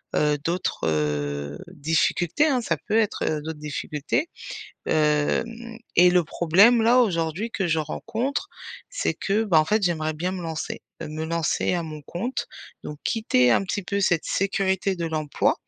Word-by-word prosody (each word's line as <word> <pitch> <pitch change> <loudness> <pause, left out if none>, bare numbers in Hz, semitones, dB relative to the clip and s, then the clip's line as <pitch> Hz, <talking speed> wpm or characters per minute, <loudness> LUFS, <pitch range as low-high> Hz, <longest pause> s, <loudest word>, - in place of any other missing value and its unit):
heu, 150 -1 +2
d'autres, 170 - -1
heu, 75 -1 -1
difficultés, 170 - +1
hein, 265 -5 +2
ça - - -1
peut 220 - +2
être, 220 -2 +1
heu, 155 -1 -1
d'autres 155 0 -6
difficultés. 150 - -2 0.6
Hem, 225 +10 0 0.2
et 180 +1 +7
le 180 -1 +3
problème 195 +10 +4
là 235 +3 +5
aujourd'hui 185 -1 +1
que 190 -3 -1
je 160 0 +2
rencontre, 230 - -3 0.4
c'est - - -1
que, 210 +3 0
bah, 170 -7 +5
en - - +1
fait 210 +5 +1
j'aimerais 155 -3 0
bien 175 +4 -2
me 185 -1 -5
lancer, 160 -2 -4 0.2
heu, - - -5
me 155 +1 -4
lancer 165 +2 0
à 175 -1 -1
mon 155 -1 -8
compte. 200 - -4 0.3
Donc 150 - -7
quitter 125 - +3
un - - +3
petit 195 +1 -3
peu 200 +2 -1
cette 175 -4 +2
sécurité 195 0 0
de 170 -1 -2
l'emploi 155 -2 0
170 Hz, 170 wpm, -24 LUFS, 155-205 Hz, 0.6 s, et